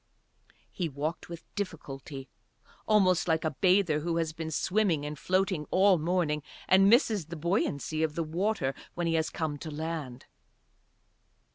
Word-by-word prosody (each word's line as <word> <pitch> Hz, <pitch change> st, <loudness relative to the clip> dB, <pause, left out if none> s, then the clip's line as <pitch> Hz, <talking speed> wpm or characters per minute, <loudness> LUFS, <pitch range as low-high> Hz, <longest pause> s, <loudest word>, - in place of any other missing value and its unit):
He 175 Hz, -4 st, -2 dB
walked 150 Hz, +5 st, -4 dB
with 170 Hz, -1 st, -8 dB
difficulty, 140 Hz, -7 st, -6 dB, 0.6 s
almost 185 Hz, -5 st, +3 dB
like 160 Hz, -1 st, +1 dB
a 155 Hz, -, +1 dB
bather 180 Hz, 0 st, +3 dB
who 165 Hz, +2 st, -1 dB
has 160 Hz, -2 st, -1 dB
been 160 Hz, 0 st, -5 dB
swimming 175 Hz, -2 st, +1 dB
and 150 Hz, +1 st, -4 dB
floating 185 Hz, -4 st, 0 dB
all 190 Hz, -1 st, +4 dB
morning 160 Hz, -2 st, 0 dB, 0.3 s
and 195 Hz, +1 st, +6 dB
misses 220 Hz, -, +3 dB
the 170 Hz, -, -6 dB
buoyancy 155 Hz, -2 st, -1 dB
of 155 Hz, -2 st, 0 dB
the 170 Hz, -, 0 dB
water 170 Hz, -2 st, -1 dB, 0.2 s
when 175 Hz, -, -1 dB
he 165 Hz, -, +1 dB
has 160 Hz, -1 st, +1 dB
come 150 Hz, -3 st, -3 dB
to 160 Hz, -, -6 dB
land. 155 Hz, -5 st, -5 dB
165 Hz, 150 wpm, -29 LUFS, 150-185 Hz, 0.6 s, and